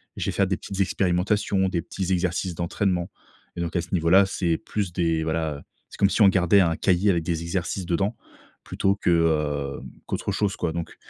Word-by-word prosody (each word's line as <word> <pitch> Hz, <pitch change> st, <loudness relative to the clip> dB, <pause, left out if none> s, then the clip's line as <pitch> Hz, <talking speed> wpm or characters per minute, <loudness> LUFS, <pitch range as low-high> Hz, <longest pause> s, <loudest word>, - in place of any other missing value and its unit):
je -, -, -3 dB
vais -, -, 0 dB
faire -, -, +1 dB
des -, -, 0 dB
petites 100 Hz, -, -7 dB
expérimentations, 95 Hz, +1 st, +1 dB
des 90 Hz, -2 st, -1 dB
petits 95 Hz, +2 st, -3 dB
exercices 90 Hz, 0 st, -1 dB
d'entraînement 90 Hz, +1 st, -1 dB, 0.5 s
et -, -, -2 dB
donc, 85 Hz, -1 st, -3 dB
à 85 Hz, -, +1 dB
ce 85 Hz, -, -10 dB
niveau-là, 90 Hz, +3 st, +5 dB
c'est 85 Hz, -4 st, -1 dB
plus 105 Hz, -3 st, -3 dB
des 80 Hz, -2 st, 0 dB
voilà, 80 Hz, -3 st, -2 dB, 0.3 s
c'est -, -, -12 dB
comme 100 Hz, -, +4 dB
si 110 Hz, -, 0 dB
on 100 Hz, -, +8 dB
gardait 95 Hz, +1 st, +4 dB
un 85 Hz, -2 st, +2 dB
cahier 95 Hz, +2 st, +2 dB
avec 85 Hz, -2 st, 0 dB
des 85 Hz, -1 st, -2 dB
exercices 90 Hz, +2 st, -3 dB
dedans 95 Hz, +6 st, 0 dB, 0.5 s
plutôt 100 Hz, 0 st, 0 dB
que, 90 Hz, -, -1 dB
heu, 75 Hz, -4 st, +1 dB, 0.2 s
qu'autre -, -, -3 dB
chose 100 Hz, -2 st, 0 dB
quoi, 85 Hz, -2 st, -2 dB
donc, 85 Hz, 0 st, -5 dB
90 Hz, 200 wpm, -24 LUFS, 85-95 Hz, 0.5 s, on